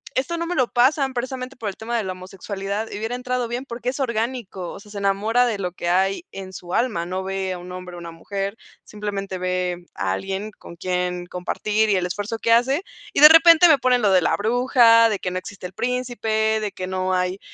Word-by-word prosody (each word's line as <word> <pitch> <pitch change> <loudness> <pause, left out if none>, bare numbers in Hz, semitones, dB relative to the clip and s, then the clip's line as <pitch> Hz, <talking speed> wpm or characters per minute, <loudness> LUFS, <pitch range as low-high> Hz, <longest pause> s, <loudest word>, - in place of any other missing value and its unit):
esto 335 +6 -1
no 335 - -2
me 355 - -3
lo 255 -4 +1
pasan 265 +2 +3
precisamente 255 +1 -4
por 220 -4 -4
el 190 - -7
tema 235 +1 -3
de 225 - -1
la 190 - -3
homosexualidad, 195 +3 -5
y - - -5
hubiera 225 +3 -3
entrado 250 -1 -2
bien, 245 +3 -4
porque 240 -1 -4
es 265 +3 -5
orgánico. 230 -6 -3
O - - -9
sea, 205 0 -15
se 200 - -6
enamora 215 +5 +2
de 220 -3 -1
lo 180 -2 -3
que 175 -1 -4
hay 195 - +1
en 190 -1 -8
su 175 0 -6
alma. 215 -9 0
No 185 +1 -3
ve 190 -1 -2
a 180 - -5
un 180 +1 -10
hombre 180 -1 -8
o - - -8
una 170 -1 -8
mujer, 195 +5 -4 0.3
simplemente 200 -2 -5
ve 180 -1 -2
a 95 +1 -1
alguien 195 - -4
con 170 - -11
quien 180 0 -2
compartir 210 +4 -1
y 200 - +3
el 180 -1 0
esfuerzo 205 +5 -3
que 230 - 0
hace 265 +9 +3 0.3
y - - +1
de 300 - +13
repente 330 +1 +8
me 300 -4 +5
ponen 250 -1 +2
lo 200 - +4
de 185 -1 +5
la - - +2
bruja, 230 0 +5
de 205 - -1
que 180 - -3
no 185 - -2
existe 195 0 -10
el 180 - -7
príncipe, 225 -3 0
de 210 -2 -2
que 185 - -5
no 185 0 -1
hay 180 +1 -1
205 Hz, 235 wpm, -22 LUFS, 185-245 Hz, 0.3 s, de